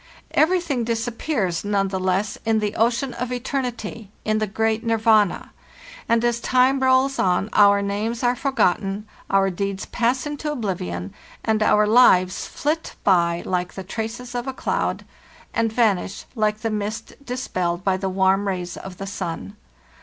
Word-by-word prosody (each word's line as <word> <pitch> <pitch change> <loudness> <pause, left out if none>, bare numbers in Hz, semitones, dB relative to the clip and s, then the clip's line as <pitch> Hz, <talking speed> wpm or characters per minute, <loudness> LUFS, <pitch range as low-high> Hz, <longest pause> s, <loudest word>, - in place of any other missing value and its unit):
Everything 320 -6 +2
dis 230 +1 -1
appears 225 - -1
none 200 -1 +1
the 190 -1 -2
less 190 +2 0
in 225 -1 +2
the 210 -1 -1
ocean 240 +3 +1
of 250 0 -4
eternity, 245 -4 -4 0.2
in 215 0 +1
the 215 - 0
great 220 +2 0
Nirvana; 220 -4 +2 0.6
and 230 +1 +3
as 240 -1 +1
time 255 +3 +3
rolls 260 +1 +3
on 185 +3 +1
our 200 -1 +5
names 215 +4 -2
are 245 0 +3
for 275 +2 -2
gotten, 205 -3 0 0.2
our 195 0 +3
deeds 195 +1 -3
pass 245 +3 0
into 295 +1 -3
oblivion, 100 - -4 0.3
and 220 -1 +1
our 210 0 +4
lives 200 -5 +4
flit 310 +3 -2
by 170 -3 +3
like 180 -1 -2
the 190 - -6
traces 225 +5 -5
of 245 +1 -3
a 265 - -2
cloud, - - -2 0.5
and 230 -1 +1
vanish 215 -5 0
like 215 -2 0
the 225 - -1
mist 210 +1 -4
dispelled 185 -9 -2
by 195 -2 +2
the 190 0 -2
warm 190 +1 +2
rays 180 -2 -3
of 185 -2 -9
the 195 - -5
sun. 195 0 -5
215 Hz, 160 wpm, -22 LUFS, 195-245 Hz, 0.6 s, our